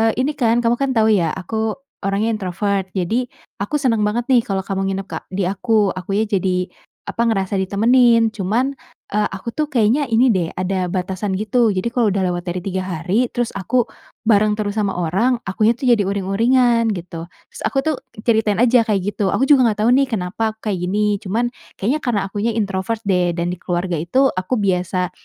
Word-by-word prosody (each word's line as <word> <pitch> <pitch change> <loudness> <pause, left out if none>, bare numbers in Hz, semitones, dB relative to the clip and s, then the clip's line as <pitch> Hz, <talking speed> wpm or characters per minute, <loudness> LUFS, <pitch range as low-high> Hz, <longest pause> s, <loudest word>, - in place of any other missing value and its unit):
eee, 225 0 +3
ini 285 +4 +1
kan 235 -2 +2
kamu 235 +1 +3
kan 275 -1 +1
tahu 220 0 +4
ya, 170 -5 +1
aku 220 +3 -2 0.2
orangnya 200 +3 0
introvert 195 -1 -2
jadi 230 +8 0 0.3
aku 205 +9 -1
seneng 245 -6 +1
banget 210 +3 0
nih 245 - +6
kalau 195 -3 -3
kamu 195 -1 -2
nginep 195 0 -2
ke - - -4 0.2
di 200 - 0
aku, 200 +2 +1
akunya 195 +4 -1
jadi 185 -3 0 0.4
apa, 235 0 0
ngerasa 195 -3 0
ditemenin, 230 +4 +4
cuman, 225 +6 0 0.4
eee, 210 +1 +1
aku 195 +5 -5
tuh 305 +5 -2
kayaknya 250 +4 +2
ini 235 +2 +3
deh, 180 -5 +1
ada 185 0 -1
batasan 190 +2 -2
gitu, 220 +3 +2
jadi 185 +5 -1
kalau 240 -2 +1
udah 195 - 0
lewat 175 0 -3
dari 180 +1 -3
3 190 -1 -2
hari 185 +8 0
terus 240 -1 -1
aku 240 +6 +1 0.4
bareng 215 -2 +3
terus 210 0 -3
sama 200 -2 0
orang, 195 +9 0
akunya 215 +4 +3
tuh 255 0 0
jadi 215 -4 +4
uring-uringan," 230 +4 +2
gitu. 170 -2 -7 0.2
Terus - - -10
aku - - -3
tuh 310 -2 0 0.3
ceritain 220 -2 +2
aja 245 -1 +4
kayak 205 -3 +1
gitu, 205 -1 -2
"Aku - - 0
juga 265 -4 +6
nggak 210 -2 0
tahu 235 - +4
nih 275 0 +3
kenapa 215 +3 -1
aku 220 -1 -5
kayak 190 - -1
gini 205 +1 +1
cuman 215 +6 -1 0.4
kayaknya 255 +10 +1
karena 230 -5 +1
akunya 220 +3 -1
introvert 205 +1 -2
deh 180 -2 +2
dan 170 0 -2
di 180 - -5
keluarga 175 0 -2
itu 260 - +2
aku 185 +7 -2
biasa 180 -2 0
210 Hz, 195 wpm, -19 LUFS, 190-230 Hz, 0.4 s, nih